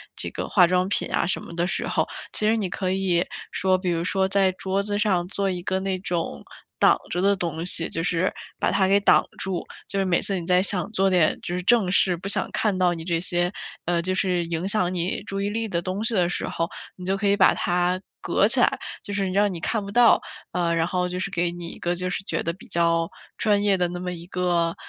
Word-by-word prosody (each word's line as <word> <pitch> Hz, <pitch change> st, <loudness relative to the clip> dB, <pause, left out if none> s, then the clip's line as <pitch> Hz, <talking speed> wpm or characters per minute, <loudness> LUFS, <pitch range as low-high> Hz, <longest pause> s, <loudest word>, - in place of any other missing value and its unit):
这 -, -, -2 dB
个 -, -, -4 dB
化 180 Hz, -4 st, +5 dB
妆 180 Hz, +1 st, +1 dB
品 -, -, -1 dB
啊 -, -, +1 dB
什 180 Hz, -, -1 dB
么 170 Hz, -, -10 dB
的 175 Hz, 0 st, 0 dB
时 -, -, -2 dB
候， -, -, 0 dB, 0.3 s
其 215 Hz, -, +1 dB
实 220 Hz, -, +3 dB
你 200 Hz, -4 st, -2 dB
可 185 Hz, 0 st, -2 dB
以 185 Hz, -2 st, +1 dB, 0.3 s
说 185 Hz, 0 st, +1 dB
比 185 Hz, -1 st, -2 dB
如 170 Hz, 0 st, -1 dB
说 190 Hz, +1 st, +1 dB
在 195 Hz, -1 st, +3 dB
桌 190 Hz, +1 st, -2 dB
子 205 Hz, 0 st, -2 dB
上 185 Hz, -5 st, +1 dB
做 200 Hz, 0 st, -1 dB
一 180 Hz, -1 st, -3 dB
个 190 Hz, +1 st, -1 dB
那 190 Hz, 0 st, -2 dB
种 170 Hz, -, -3 dB, 0.3 s
挡 -, -, +5 dB
着 175 Hz, -, -2 dB
的 200 Hz, +1 st, +3 dB
东 170 Hz, -2 st, -4 dB
西， 170 Hz, -2 st, +2 dB
就 165 Hz, -, -2 dB
是 180 Hz, +1 st, +1 dB, 0.3 s
把 -, -, +2 dB
它 190 Hz, -1 st, +3 dB
给 200 Hz, +1 st, +4 dB
挡 200 Hz, -, +4 dB
住。 190 Hz, -2 st, -3 dB, 0.2 s
就 200 Hz, -, -3 dB
是 195 Hz, -, +1 dB
每 175 Hz, -2 st, +2 dB
次 195 Hz, -2 st, 0 dB
你 170 Hz, -, -7 dB
在 180 Hz, +1 st, +3 dB
想 190 Hz, -1 st, +3 dB
做 195 Hz, -2 st, +2 dB
点 175 Hz, -4 st, +2 dB
就 175 Hz, -, -4 dB
是 180 Hz, -, -4 dB
正 210 Hz, -3 st, +3 dB
事， 185 Hz, -1 st, +3 dB
不 190 Hz, +4 st, -6 dB
想 -, -, +3 dB
看 205 Hz, -4 st, 0 dB
到 180 Hz, -1 st, +2 dB
你 165 Hz, -, -6 dB
这 170 Hz, -1 st, 0 dB
些 175 Hz, 0 st, +1 dB, 0.3 s
呃， 175 Hz, 0 st, +1 dB
就 185 Hz, +2 st, 0 dB
是 185 Hz, -2 st, 0 dB
影 165 Hz, +2 st, -3 dB
响 185 Hz, -3 st, +1 dB
你 180 Hz, +2 st, -2 dB
注 195 Hz, -1 st, -4 dB
意 200 Hz, -, -1 dB
力 225 Hz, +1 st, -2 dB
的 170 Hz, -3 st, -1 dB
东 185 Hz, +4 st, -3 dB
西 225 Hz, -, +4 dB
的 180 Hz, -4 st, +2 dB
时 -, -, -3 dB
候， 165 Hz, +1 st, -2 dB, 0.3 s
你 180 Hz, -, -11 dB
就 195 Hz, +1 st, 0 dB
可 205 Hz, 0 st, 0 dB
以 200 Hz, -, +4 dB
把 -, -, +5 dB
它 180 Hz, +1 st, 0 dB, 0.2 s
隔 -, -, +2 dB
起 -, -, +5 dB
来， -, -, +3 dB, 0.3 s
就 205 Hz, -, -6 dB
是 195 Hz, -1 st, -1 dB
让 205 Hz, +1 st, +2 dB
你 170 Hz, -, -4 dB
看 220 Hz, +1 st, 0 dB
不 200 Hz, -, -7 dB
到， 235 Hz, +1 st, +5 dB, 0.3 s
呃， 170 Hz, -2 st, 0 dB
然 165 Hz, -1 st, +1 dB
后 180 Hz, +1 st, -1 dB
就 180 Hz, -, -4 dB
是 195 Hz, +1 st, -3 dB
给 175 Hz, -1 st, 0 dB
你 175 Hz, -1 st, -7 dB
一 -, -, -10 dB
个 175 Hz, 0 st, -1 dB
就 180 Hz, +1 st, -2 dB
是 195 Hz, -, -3 dB
觉 -, -, -2 dB
得 165 Hz, -, -1 dB
比 185 Hz, -, -15 dB
较 170 Hz, 0 st, +1 dB, 0.3 s
专 205 Hz, -2 st, +2 dB
业 200 Hz, -1 st, +3 dB
的 180 Hz, -1 st, +1 dB
那 175 Hz, 0 st, -6 dB
么 180 Hz, 0 st, -3 dB
一 170 Hz, 0 st, -8 dB
个， 175 Hz, -2 st, 0 dB
185 Hz, 275 characters per minute, -24 LUFS, 175-195 Hz, 0.3 s, 化